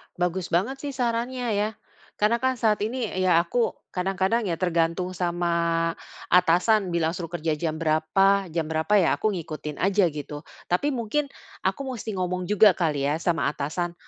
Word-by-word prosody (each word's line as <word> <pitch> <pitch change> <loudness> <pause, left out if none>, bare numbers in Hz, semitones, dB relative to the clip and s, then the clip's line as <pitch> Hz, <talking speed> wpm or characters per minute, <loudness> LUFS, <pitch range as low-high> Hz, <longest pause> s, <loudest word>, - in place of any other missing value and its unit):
Bagus 180 0 -1
banget 220 +11 0
sih 285 -1 -5
sarannya 245 0 -1
ya. 210 +1 +1 0.5
Karena 215 +3 +2
kan 260 -1 +1
saat 215 -3 +1
ini 235 +3 -1
ya 185 -2 +4
aku 230 +7 0 0.2
kadang-kadang 195 +4 0
ya, 170 - -1
tergantung 170 +1 0
sama 170 -2 0 0.4
atasan 180 +3 +4
bilang 165 -1 0
suruh 170 -2 -5
kerja 165 -2 -1
jam 155 0 -2
berapa, 175 +5 +2
jam 160 0 -2
berapa 160 +2 -2
ya 180 - +4
aku 215 - +1
ngikutin 155 -4 -6
aja 195 -1 +3
gitu. 150 -1 -7 0.3
Tapi 180 +12 +2
mungkin 260 +5 -1 0.3
aku 280 - -1
musti 225 -6 -5
ngomong 180 0 -2
juga 210 -1 +6
kali 150 -5 0
ya 150 +3 0
sama 170 -2 +1
atasan. 165 +4 -3
180 Hz, 160 wpm, -25 LUFS, 165-215 Hz, 0.5 s, juga